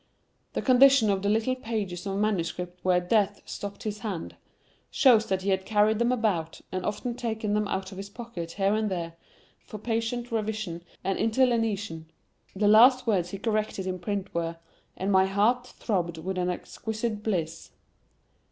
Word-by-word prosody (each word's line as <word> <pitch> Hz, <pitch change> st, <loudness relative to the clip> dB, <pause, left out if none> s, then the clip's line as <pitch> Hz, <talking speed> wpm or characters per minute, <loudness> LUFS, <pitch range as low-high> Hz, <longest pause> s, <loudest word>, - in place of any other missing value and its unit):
The -, -, -2 dB
condition 260 Hz, -3 st, +6 dB
of 195 Hz, -1 st, 0 dB
the 200 Hz, -, 0 dB
little 225 Hz, +4 st, +2 dB
pages 210 Hz, -7 st, -4 dB
of 195 Hz, 0 st, -2 dB
manuscript 180 Hz, -3 st, -1 dB
where 180 Hz, -1 st, +4 dB
Death 205 Hz, +2 st, +1 dB
stopped 200 Hz, 0 st, -7 dB
his 210 Hz, -1 st, -4 dB
hand, 195 Hz, -5 st, -5 dB, 0.5 s
shows 240 Hz, -6 st, +5 dB
that 190 Hz, -1 st, -1 dB
he 200 Hz, -, -1 dB
had 190 Hz, 0 st, +1 dB
carried 210 Hz, +1 st, +2 dB
them 235 Hz, +1 st, +2 dB
about, 200 Hz, -10 st, -1 dB
and 185 Hz, 0 st, -3 dB
often 210 Hz, +5 st, -2 dB
taken 220 Hz, -3 st, -2 dB
them 210 Hz, 0 st, +1 dB
out 190 Hz, 0 st, -3 dB
of 190 Hz, -, -8 dB
his 200 Hz, +1 st, -7 dB
pocket 200 Hz, -7 st, -7 dB
here 195 Hz, 0 st, +1 dB
and 215 Hz, 0 st, 0 dB
there, 170 Hz, -3 st, -3 dB, 0.5 s
for 215 Hz, -, -8 dB
patient 230 Hz, +2 st, -2 dB
revision 215 Hz, -6 st, -2 dB, 0.2 s
and 195 Hz, +1 st, -1 dB
interlineation. 220 Hz, -8 st, +1 dB, 0.5 s
The 205 Hz, +2 st, +2 dB
last 250 Hz, +5 st, +7 dB
words 190 Hz, -6 st, +1 dB
he 195 Hz, -, -5 dB
corrected 215 Hz, -2 st, -1 dB
in 185 Hz, -1 st, -3 dB
print 200 Hz, +2 st, -3 dB
were, 165 Hz, 0 st, -2 dB, 0.4 s
"And 195 Hz, +2 st, -1 dB
my 190 Hz, 0 st, +5 dB
heart 225 Hz, +6 st, +2 dB
throbbed 175 Hz, -9 st, -2 dB
with 185 Hz, +3 st, -3 dB
an 180 Hz, 0 st, 0 dB
exquisite 215 Hz, +4 st, -4 dB
bliss". 175 Hz, -7 st, -2 dB
205 Hz, 170 wpm, -27 LUFS, 185-225 Hz, 0.5 s, last